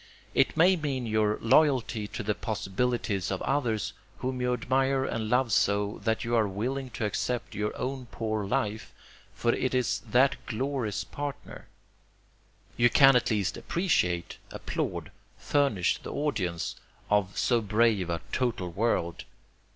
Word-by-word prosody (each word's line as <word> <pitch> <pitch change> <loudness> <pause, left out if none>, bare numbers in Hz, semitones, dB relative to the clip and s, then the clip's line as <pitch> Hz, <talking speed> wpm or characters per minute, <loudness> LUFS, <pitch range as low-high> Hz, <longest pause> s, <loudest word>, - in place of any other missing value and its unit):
It 135 - +2
may 180 +4 +6
mean 140 -6 -2
your 110 -1 +1
loyalty 120 -4 +3
to 115 - -5
the 105 +1 0
possibilities 105 -1 -1
of 95 - -2
others 120 -7 0 0.2
whom 130 0 -3
you 125 0 +1
admire 130 +2 +1
and 110 -4 -2
love 125 0 +2
so, 100 +1 +1
that 110 0 +1
you 120 - -2
are 110 -2 +3
willing 125 +7 -3
to 110 - -1
accept 120 +4 -2
your 105 +1 -2
own 130 0 -4
poor 110 -2 -2
life, 105 +2 -2 0.4
for 120 0 +1
it 130 0 -1
is 125 -1 +1
that 130 +5 +3
glory's 125 -3 -2
partner. 145 -1 -7 1.1
You 120 0 +5
can 135 +2 +7
at 125 - +3
least 105 -4 0
appreciate, 90 - 0
applaud, - - -4 0.3
furnish 140 -11 +1
the - - -7
audience, 95 - -2 0.3
of 100 -2 +1
so 120 -2 +2
brave 105 -3 +2
a 85 -1 -2
total 115 -9 -1
world. 85 -4 -1
115 Hz, 145 wpm, -28 LUFS, 105-130 Hz, 1.1 s, can